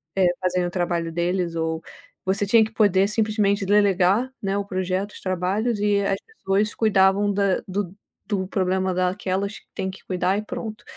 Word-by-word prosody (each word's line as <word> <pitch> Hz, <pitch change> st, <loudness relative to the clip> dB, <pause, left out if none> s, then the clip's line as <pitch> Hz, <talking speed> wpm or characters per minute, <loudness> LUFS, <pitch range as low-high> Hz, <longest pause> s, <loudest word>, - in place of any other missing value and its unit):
eh, 190 Hz, -2 st, +4 dB
fazendo 180 Hz, -1 st, +1 dB
o -, -, -3 dB
trabalho 170 Hz, -2 st, -1 dB
deles 175 Hz, 0 st, -1 dB
ou 160 Hz, 0 st, -1 dB, 0.4 s
você 195 Hz, +2 st, +1 dB
tinha 220 Hz, +2 st, +5 dB
que 220 Hz, -, -3 dB
poder, 200 Hz, -3 st, +3 dB
simplesmente, 210 Hz, -2 st, +1 dB
delegar, 200 Hz, +3 st, +3 dB
né, 195 Hz, -1 st, -1 dB
o 200 Hz, -, -1 dB
projeto, 185 Hz, +1 st, -2 dB
os -, -, -11 dB
trabalhos 195 Hz, +5 st, -1 dB
e 205 Hz, -1 st, +2 dB
as 195 Hz, 0 st, 0 dB
pessoas 210 Hz, -, -1 dB
cuidavam 200 Hz, -1 st, +3 dB
da 200 Hz, -1 st, +1 dB
do 195 Hz, -1 st, -3 dB, 0.3 s
do 195 Hz, -3 st, -1 dB
problema 190 Hz, -1 st, 0 dB
daquelas 190 Hz, +2 st, -1 dB
que -, -, -30 dB
tem 190 Hz, -, -3 dB
que 190 Hz, -, -10 dB
cuidar 185 Hz, +1 st, 0 dB
e 210 Hz, -, -2 dB
pronto. 215 Hz, 0 st, -6 dB
195 Hz, 175 wpm, -23 LUFS, 185-205 Hz, 0.4 s, tinha